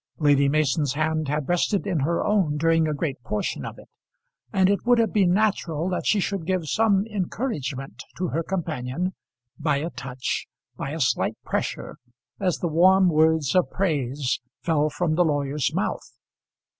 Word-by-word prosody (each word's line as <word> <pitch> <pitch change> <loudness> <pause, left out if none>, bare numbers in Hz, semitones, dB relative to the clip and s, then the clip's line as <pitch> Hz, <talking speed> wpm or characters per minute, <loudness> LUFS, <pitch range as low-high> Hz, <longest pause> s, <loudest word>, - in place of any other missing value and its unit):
Lady 145 -2 +4
Mason's 145 -1 +1
hand 155 0 0
had 150 0 -2
rested 180 +3 +1
in 185 -6 0
her 165 +5 0
own 195 -8 +2
during 165 +1 +3
a 155 - 0
great 140 -4 -3
portion 105 -2 -3
of - - -7
it; - - -14 0.6
and 190 -1 +3
it 200 +1 +1
would 245 0 +4
have 230 -1 +1
been 195 -4 +3
natural 180 -5 +1
that 180 - -2
she 210 - +3
should 195 -3 -2
give 185 -3 0
some 205 +1 +2
encouragement 180 - -4 0.2
to 180 -1 -1
her 165 - -1
companion 165 -1 -3 0.5
by 150 -2 +1
a 160 +4 -3
touch, 125 0 -4 0.3
by - - -4
a 160 +3 -4
slight 130 - +1
pressure, - - -3 0.4
as 185 -4 0
the 175 - -2
warm 185 +3 +5
words 160 -2 +3
of 180 -1 +3
praise 140 -8 -1 0.2
fell 155 -3 +2
from 160 +1 -1
the 175 +3 +3
lawyer's 145 -2 0
mouth. - - -3
160 Hz, 170 wpm, -24 LUFS, 145-185 Hz, 0.6 s, warm